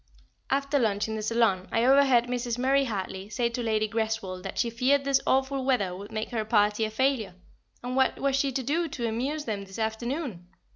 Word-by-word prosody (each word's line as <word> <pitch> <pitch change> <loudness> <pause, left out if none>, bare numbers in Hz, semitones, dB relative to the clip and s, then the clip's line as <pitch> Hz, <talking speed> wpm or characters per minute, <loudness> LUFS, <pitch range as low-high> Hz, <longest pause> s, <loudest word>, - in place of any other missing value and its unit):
After 275 +1 +1
lunch 210 -4 +1
in 220 - -3
the 215 - -3
saloon 215 -4 +1
I 230 +1 +2
overheard 265 -2 +5
Mrs. 245 -1 -3
Murray 270 +2 +2
Hartley 195 -3 -4
say 235 +1 0
to 235 +1 -4
Lady 215 -2 +1
Greswold 220 -4 -2
that 195 +1 -7
she 235 -1 +1
feared 265 +4 +2
this 275 -1 +2
awful 265 0 +1
weather 205 -9 +1
would 200 +2 -9
make 215 +2 -4
her 225 -3 -1
party 210 0 +2
a - - -3
failure, 225 -4 0 0.5
and 250 +1 -3
what 265 0 +2
was 275 -1 +1
she 275 0 +1
to 265 +1 -2
do 325 +7 0
to 240 -6 -3
amuse 270 +7 -2
them 205 -3 -3
this 195 -1 -11
afternoon? 225 - -3
235 Hz, 205 wpm, -27 LUFS, 215-265 Hz, 0.5 s, overheard